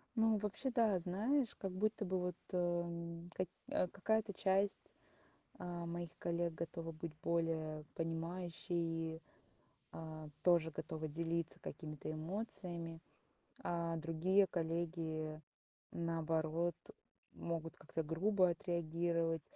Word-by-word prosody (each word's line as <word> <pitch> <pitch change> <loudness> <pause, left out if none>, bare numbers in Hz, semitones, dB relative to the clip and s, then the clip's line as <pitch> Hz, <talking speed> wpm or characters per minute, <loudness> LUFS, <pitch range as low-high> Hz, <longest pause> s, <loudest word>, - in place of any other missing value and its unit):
Ну, 225 -2 +5
вообще, 210 +6 -1
да, 225 -6 +4
знаешь, 225 +9 +2
как 195 - -3
будто 210 +2 +1
бы 185 0 +1
вот, 180 -1 -1 0.2
э 180 - +1
м 170 -1 0
как 185 +1 0 0.2
э, 180 - +3
какая-то 220 +3 +1
часть, 195 +2 +3 0.8
а, 175 -1 -3
моих 170 0 -3
коллег 170 0 +1
готова 165 0 -3
быть 160 0 -5
более 160 -2 +1
понимающей, 165 -1 -1 0.7
а, 155 -1 -6
тоже 170 -2 +5
готовы 155 +1 -3
делиться 165 +1 -1
какими-то 150 -2 -5
эмоциями. 170 -1 -3 0.7
А 170 -1 0
другие 165 +5 +4
коллеги, 160 -2 -1 0.5
наоборот, 165 0 +1 0.6
могут 165 -1 -3
как-то 160 +1 -3
грубо 185 +4 +4
отреагировать 170 -1 +1
170 Hz, 105 wpm, -39 LUFS, 165-180 Hz, 0.8 s, Ну